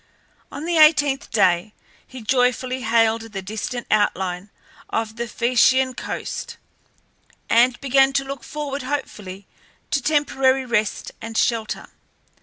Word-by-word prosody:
On 305 - -6
the 340 -1 +1
eighteenth 290 -3 +4
day 190 -1 +2 0.3
he 255 -3 -10
joyfully 255 +1 +1
hailed 225 -1 +2
the 195 - -4
distant 220 +5 -5
outline 190 -2 0 0.4
of 220 -1 -2
the 235 0 -4
Phaeacian 255 +3 +3
coast, - - -6 0.9
and 240 +2 +4
began 270 0 +4
to 275 - +1
look 275 -2 -7
forward 290 -2 -5
hopefully 210 -8 -5 0.5
to 280 - +1
temporary 270 -2 +2
rest 220 -4 -1
and 225 0 -6
shelter. 225 -2 -1
245 Hz, 120 wpm, -22 LUFS, 220-270 Hz, 0.9 s, eighteenth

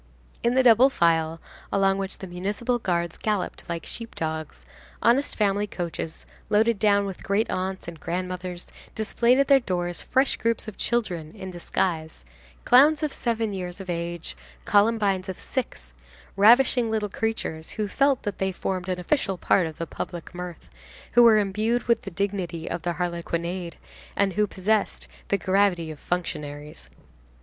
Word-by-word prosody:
In 235 +1 +1
the 260 - +5
double 245 +2 +7
file, 165 -6 +2 0.3
along 195 0 +2
which 195 0 -4
the - - -7
municipal 205 +7 -2
guards 170 -5 -1
galloped 210 -4 -2
like 170 -1 -4
sheep 230 -1 -7
dogs, 155 - -4 0.3
honest 255 +5 +2
family 205 -1 +1
coaches, 170 -4 -5 0.2
loaded 215 +1 +3
down 200 -1 +3
with 195 -2 -6
great 210 +3 0
aunts 190 0 -3
and 165 -2 -8
grandmothers, 180 +1 -4 0.3
displayed 235 +3 +2
at 275 0 +3
their 275 -1 +7
doors 175 -6 -2
fresh 265 +1 +1
groups 230 0 0
of 215 - -7
children 180 -9 -2
in 190 -3 -7
disguise, 170 -2 -2 0.4
Clowns 295 +5 +6
of 300 - -1
seven 225 -3 -1
years 180 -1 -5
of 185 -2 -5
age, 170 - -4 0.3
Columbines 205 -3 +2
of 185 - -4
six, 65 - -5 0.4
ravishing 235 +3 +5
little 215 -1 0
creatures, 195 -7 -3
who 215 -1 -3
felt 275 +4 +2
that 205 -2 -4
they 190 0 0
formed 185 0 -3
an 180 -1 -1
official 195 -1 0
part 175 0 +2
of 160 - -9
the 165 - -3
public 175 +1 -6
mirth, 180 -2 -7 0.4
who 240 - +6
were 230 -2 +8
imbued 215 +4 +1
with 235 - +2
the - - -6
dignity 180 -3 -3
of 170 - -3
their 175 +2 -1
harlequinade, 170 0 -3 0.4
and 200 -1 +2
who 210 +2 +2
possessed 200 +2 0 0.2
the 200 - +2
gravity 185 -4 +1
of 150 - -10
functionaries. 150 - -5
190 Hz, 160 wpm, -25 LUFS, 175-220 Hz, 0.4 s, were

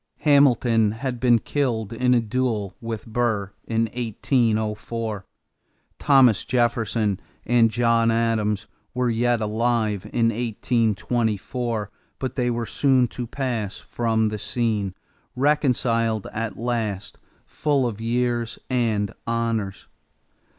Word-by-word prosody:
Hamilton 120 -7 +4
had 125 +1 -4
been 120 -1 +5
killed 115 -4 -2
in 125 +2 +2
a - - +4
duel 115 -3 -1
with 115 -1 -5
Burr 110 -4 -1
in 115 -1 0
1804. 110 -3 -1 0.7
Thomas 135 -7 +5
Jefferson 115 -5 0 0.3
and 115 -1 +4
John 115 0 +2
Adams 115 -2 +1 0.3
were 125 -1 +1
yet 120 0 +1
alive 110 -2 0
in 115 -1 +2
1824 115 0 -1 0.3
but 130 -2 -4
they 125 -2 +1
were 120 -1 -1
soon 130 0 +2
to 120 +1 -5
pass 115 -6 -3
from 110 -2 0
the 105 0 -4
scene, 105 -4 -1 0.4
reconciled 125 -6 +1
at 110 0 -3
last, 110 -4 -3 0.3
full 145 -4 0
of 110 -2 -3
years 120 0 -1
and 110 -5 0
honors. 115 -4 -2
115 Hz, 110 wpm, -23 LUFS, 110-120 Hz, 0.7 s, been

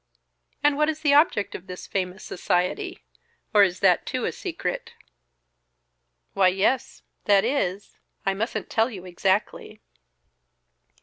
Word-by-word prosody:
"And 290 -1 +3
what 300 +1 +3
is 310 0 -3
the 290 -2 +3
object 290 - +3
of 185 - -8
this 180 0 -8
famous 190 0 -3
society? 270 - -2 0.5
Or 210 - +7
is 185 -2 +2
that 185 -3 +4
too - - -2
a - - 0
secret?" - - -5 1.4
"Why, 195 -1 +4
yes, 195 +8 0 0.2
that 200 -1 +4
is, 205 -7 -2 0.3
I 195 - +2
mustn't 220 +5 -3
tell 225 +2 +2
you 190 -6 -9
exactly." 190 +3 -1
200 Hz, 130 wpm, -25 LUFS, 185-275 Hz, 1.4 s, Or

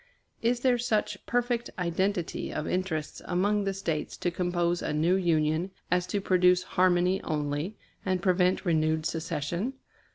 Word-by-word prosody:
Is 240 +1 +1
there 250 -2 +3
such 215 -4 -1
perfect 240 0 0
identity 180 0 -1
of 155 - -3
interests 180 -5 -2
among 200 +3 +1
the 195 - 0
States 160 -6 -3
to 175 - -1
compose 175 0 0
a - - -2
new 160 +4 +2
Union 165 -1 +1 0.2
as 180 0 +2
to 205 - -1
produce 180 -1 +4
harmony 180 0 +2
only, 150 +5 -2 0.3
and 185 -1 0
prevent 180 +1 +2
renewed 155 -2 +1
secession? 165 - -2
180 Hz, 140 wpm, -28 LUFS, 165-195 Hz, 0.3 s, produce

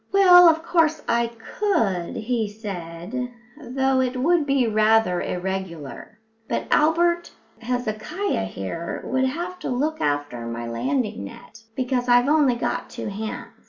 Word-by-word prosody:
"Well, 360 -3 +8
of 320 0 +1
course 325 -2 +2
I 235 0 +2
could," 230 - -1
he 225 -1 -1
said, 205 +3 -6 0.2
"though 265 -2 0
it 255 0 -1
would 310 +3 +2
be 275 -2 +2
rather 215 -4 +3
irregular. 180 - -5 0.3
But - - -1
Albert 345 +2 +2 0.3
Hezekiah 245 - -2
here 95 - -5
would 260 +1 +1
have 345 +7 -4
to - - -4
look 295 +5 -1
after 145 -5 -2
my 115 0 -5
landing 215 - -2
net, 230 -1 -13
because 250 -1 -1
I've 245 +2 +5
only 295 -5 +4
got 245 +1 -3
two - - -5
hands." 215 +2 -6
245 Hz, 135 wpm, -23 LUFS, 195-295 Hz, 0.3 s, Well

